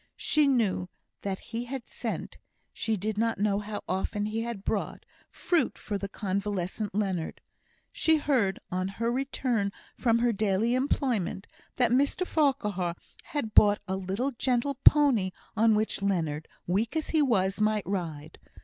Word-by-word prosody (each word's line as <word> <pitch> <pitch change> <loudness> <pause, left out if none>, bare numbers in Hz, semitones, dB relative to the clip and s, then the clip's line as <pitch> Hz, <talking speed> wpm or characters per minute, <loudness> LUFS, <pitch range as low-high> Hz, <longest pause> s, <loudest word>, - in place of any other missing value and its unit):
She 300 -1 +3
knew 210 -9 +1 0.3
that 195 -1 -2
he 230 +4 -6
had 260 0 -5
sent - - -5 0.3
she 220 -1 -1
did 210 +2 -2
not 230 0 +1
know 200 0 +1
how 210 0 -5
often 195 +2 -1
he 215 +2 -2
had 230 -4 -5
brought - - -2 0.2
fruit 345 -3 0
for 205 -3 -4
the 200 - -4
convalescent 200 0 -2
Leonard. 190 -6 -1 0.5
She 320 -1 +3
heard, 255 -10 +1
on 185 +1 -1
her 230 +4 -2
return 245 -5 -1 0.2
from 230 -2 +2
her 235 0 +2
daily 215 +3 +1
employment, 250 - 0 0.3
that 245 -2 +2
Mr 280 +8 +2
Farquhar 210 - 0 0.3
had 260 -8 -3
brought 205 -1 +6
a 190 - -1
little 195 +8 -2
gentle 255 +2 0
pony 250 -11 +5 0.2
on 220 0 +4
which 215 -1 0
Leonard, 160 -6 -1 0.2
weak 210 - 0
as 315 - -1
he 315 - +3
was, 200 -7 +2
might 215 -1 +2
ride. 160 -5 -4
215 Hz, 150 wpm, -28 LUFS, 195-245 Hz, 0.5 s, brought